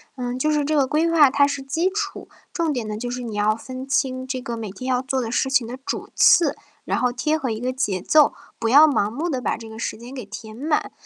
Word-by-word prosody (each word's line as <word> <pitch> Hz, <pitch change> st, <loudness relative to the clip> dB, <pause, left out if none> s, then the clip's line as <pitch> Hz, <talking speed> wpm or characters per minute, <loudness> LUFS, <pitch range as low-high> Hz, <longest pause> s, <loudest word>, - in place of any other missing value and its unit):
嗯， 250 Hz, 0 st, -4 dB
就 305 Hz, -, +1 dB
是 295 Hz, -2 st, +1 dB
这 310 Hz, -, 0 dB
个 275 Hz, -3 st, +3 dB
规 310 Hz, +4 st, +1 dB
划 300 Hz, -5 st, +6 dB
它 280 Hz, +1 st, +4 dB
是 285 Hz, -1 st, -2 dB
基 325 Hz, +7 st, 0 dB
础， 405 Hz, 0 st, -4 dB, 0.2 s
重 330 Hz, -3 st, -1 dB
点 235 Hz, -4 st, -3 dB
呢， 210 Hz, 0 st, -4 dB
就 245 Hz, +2 st, -4 dB
是 250 Hz, 0 st, -4 dB
你 230 Hz, -3 st, -6 dB
要 210 Hz, +1 st, +2 dB
分 255 Hz, +3 st, -8 dB
清 260 Hz, -2 st, 0 dB
这 260 Hz, -1 st, -4 dB
个 235 Hz, -1 st, -5 dB
每 220 Hz, -3 st, -5 dB
天 255 Hz, +7 st, -6 dB
要 250 Hz, -1 st, +2 dB
做 265 Hz, 0 st, -2 dB
的 225 Hz, -2 st, -4 dB
事 265 Hz, +2 st, 0 dB
情 260 Hz, -4 st, +2 dB
的 250 Hz, +2 st, -6 dB
主 -, -, -4 dB
次， 340 Hz, -, +5 dB, 0.3 s
然 -, -, 0 dB
后 250 Hz, -1 st, +1 dB
贴 300 Hz, +5 st, 0 dB
合 265 Hz, -6 st, -3 dB
一 220 Hz, -, -3 dB
个 250 Hz, +1 st, -1 dB
节 210 Hz, -8 st, -1 dB
奏， 300 Hz, -, +4 dB, 0.2 s
不 230 Hz, -, -1 dB
要 290 Hz, +6 st, +8 dB
盲 215 Hz, -8 st, +1 dB
目 315 Hz, +8 st, -3 dB
地 265 Hz, -5 st, -1 dB
把 250 Hz, -, -1 dB
这 225 Hz, -1 st, -10 dB
个 220 Hz, -, -10 dB
时 -, -, -3 dB
间 240 Hz, +3 st, -11 dB
给 255 Hz, -6 st, -7 dB
填 215 Hz, +1 st, -9 dB
满。 300 Hz, +4 st, -1 dB
255 Hz, 290 characters per minute, -22 LUFS, 230-290 Hz, 0.3 s, 要